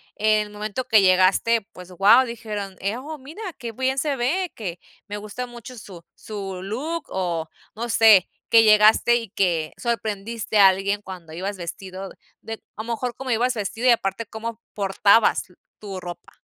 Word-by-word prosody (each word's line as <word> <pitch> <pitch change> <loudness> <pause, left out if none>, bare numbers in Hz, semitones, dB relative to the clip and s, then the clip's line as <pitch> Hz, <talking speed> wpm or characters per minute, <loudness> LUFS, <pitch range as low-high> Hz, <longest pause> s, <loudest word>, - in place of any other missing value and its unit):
en 215 0 +2
el - - -14
momento 215 +4 -4
que 220 -4 +6
llegaste, 190 +5 +4
pues, 180 0 -12
guau, 205 +8 +6
dijeron: 210 -5 -6
"Eh, 200 +4 -2
oh, 300 +5 -7
mira, 295 +9 -11 0.2
qué 235 -3 -6
bien 260 +3 -1
se 285 0 0
ve, 330 +9 -1
que 180 -6 -6 0.3
me 205 0 -5
gusta 215 +4 -6
mucho 240 +1 -11
su 180 -5 -11
su 195 -3 -7
look". 295 +11 -4
O, 170 -4 -2 0.3
no 235 +2 -4
sé, 220 -5 +6 0.2
que 225 -1 +7
llegaste, 215 +2 +6
y 230 -3 -6
que 170 -5 0
sorprendiste 220 -1 -2
a 195 -2 +9
alguien 195 +2 -1
cuando 180 -5 -10
ibas 195 +4 -4
vestido 185 +2 -7 0.3
de 225 - -6 0.2
a 220 - -4
lo 235 - -5
mejor 245 +1 -3
como 265 -2 -5
ibas 245 +3 +2
vestido, 225 +4 -2
y - - +8
aparte 210 -1 0
como 225 +1 -7
portabas 200 +1 +3
l 180 - -21 0.2
tu 195 -3 -7
ropa. 175 -1 -10
215 Hz, 180 wpm, -23 LUFS, 195-235 Hz, 0.3 s, a